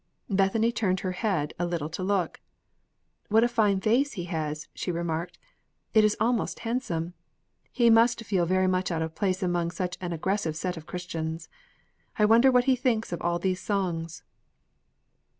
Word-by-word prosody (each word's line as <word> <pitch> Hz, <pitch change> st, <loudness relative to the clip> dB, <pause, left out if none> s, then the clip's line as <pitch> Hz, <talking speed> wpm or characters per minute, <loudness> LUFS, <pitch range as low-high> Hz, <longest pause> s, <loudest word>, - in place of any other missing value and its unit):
Bethany 200 Hz, +4 st, +2 dB
turned 190 Hz, -6 st, 0 dB
her 185 Hz, -, -2 dB
head 180 Hz, -6 st, -1 dB
a 175 Hz, -, +1 dB
little 170 Hz, -4 st, -2 dB
to 170 Hz, +4 st, -6 dB
look. 185 Hz, -3 st, -1 dB, 0.9 s
"What 220 Hz, +2 st, +5 dB
a -, -, +4 dB
fine 215 Hz, -5 st, +2 dB
face 245 Hz, +8 st, +2 dB
he 180 Hz, -, -4 dB
has!" 155 Hz, -3 st, -4 dB
she 180 Hz, -, -3 dB
remarked. 170 Hz, 0 st, -3 dB, 0.6 s
"It 220 Hz, -, +6 dB
is 215 Hz, 0 st, +2 dB
almost 235 Hz, +1 st, 0 dB
handsome. 220 Hz, -9 st, -2 dB, 0.6 s
He 235 Hz, -2 st, +4 dB
must 230 Hz, 0 st, +4 dB
feel 185 Hz, -5 st, +1 dB
very 185 Hz, +1 st, +2 dB
much 185 Hz, 0 st, +1 dB
out 165 Hz, -2 st, -1 dB
of 160 Hz, 0 st, -5 dB
place 190 Hz, 0 st, -1 dB
among 175 Hz, -1 st, 0 dB
such 180 Hz, +1 st, -4 dB
an 175 Hz, -1 st, -3 dB
aggressive 170 Hz, 0 st, -1 dB
set 180 Hz, +3 st, -3 dB
of 160 Hz, -1 st, -10 dB
Christians. 165 Hz, -2 st, -5 dB, 0.7 s
I 210 Hz, -, +4 dB
wonder 230 Hz, +5 st, +6 dB
what 250 Hz, -1 st, +4 dB
he 260 Hz, 0 st, +3 dB
thinks 230 Hz, -4 st, 0 dB
of 175 Hz, -, -4 dB
all 170 Hz, 0 st, 0 dB
these 185 Hz, +1 st, -1 dB
songs?" 175 Hz, -6 st, -2 dB
185 Hz, 170 wpm, -27 LUFS, 170-220 Hz, 0.9 s, It